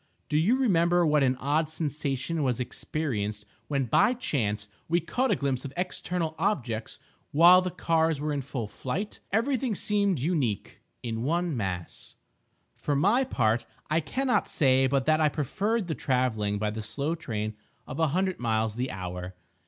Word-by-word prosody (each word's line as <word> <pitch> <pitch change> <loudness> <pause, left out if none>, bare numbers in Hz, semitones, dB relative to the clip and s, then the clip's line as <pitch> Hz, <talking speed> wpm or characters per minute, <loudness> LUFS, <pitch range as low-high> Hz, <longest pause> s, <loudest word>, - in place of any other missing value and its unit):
Do 150 - +2
you 215 +11 +3
remember 175 -7 +3
what 150 -1 +3
an 130 -1 +3
odd 150 +4 0
sensation 150 0 -2
was 130 -3 0
experienced 110 -6 -3 0.2
when, 140 -2 0
by 245 - +3
chance, 105 - -1 0.2
we 170 +1 +3
caught 250 +10 -1
a - - +3
glimpse 135 -3 -1
of 140 - -6
external 180 -2 -1
objects 120 - -1 0.3
while 175 +4 +8
the 185 - -2
cars 165 -3 +1
were 150 +1 -1
in 140 - -1
full 125 -4 -4
flight? 135 - -4
Every 235 +7 +2
thing 250 -4 -1
seemed 200 -2 +1
unique—in 120 - -3
one 170 +4 0
mass. 95 -6 -4 0.6
For 145 - -1
my 205 - +3
part, 115 - +1 0.2
I 155 - +4
cannot 255 - 0
say 135 -3 +3
but 135 0 +1
that 155 0 +3
I 155 - +4
preferred 195 - -1
the 165 - -2
travelling 120 -6 0
by 105 0 -1
the 110 +1 -5
slow 140 +9 -2
train 110 -10 -3 0.3
of 135 - -7
a 160 - +4
hundred 185 +5 0
miles 110 -2 0
the 130 +2 -1
hour. 90 0 -6
145 Hz, 165 wpm, -28 LUFS, 120-175 Hz, 0.6 s, while